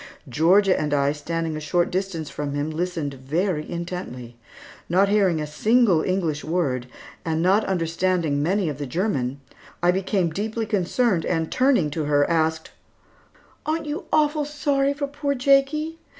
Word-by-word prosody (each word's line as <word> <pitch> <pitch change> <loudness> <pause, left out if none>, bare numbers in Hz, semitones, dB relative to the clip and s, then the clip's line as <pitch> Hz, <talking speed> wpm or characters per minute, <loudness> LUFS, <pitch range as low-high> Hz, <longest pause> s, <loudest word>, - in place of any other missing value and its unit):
Georgia 185 - +4
and 150 -1 0
I 140 0 +2
standing 160 +2 -3
a - - -3
short 170 +3 0
distance 185 -4 -2
from 145 -1 -4
him, 145 +2 -2
listened 165 -3 -3
very 150 +5 -2
intently. 170 -9 -6 0.5
Not 190 +3 +3
hearing 195 -6 +3
a 150 - -2
single 205 +3 +3
English 170 -5 -1
word, 145 -7 -1 0.4
and 160 -2 -1
not 195 +4 +4
understanding 170 -4 0
many 185 +4 +1
of 150 -2 -4
the 145 - -4
German, 140 - -1 0.4
I 175 - +5
became 185 -2 0
deeply 220 +5 -3
concerned 205 -1 +1
and 160 -1 -1
turning 255 - +2
to 155 0 -2
her 145 -1 +3
asked, 160 -1 0 0.9
"Aren't 315 +1 -2
you 300 +6 -4
awful 300 0 +2
sorry 285 -1 0
for 285 0 -2
poor 280 0 -2
Jakie? 280 +5 +2
175 Hz, 150 wpm, -23 LUFS, 155-215 Hz, 0.9 s, I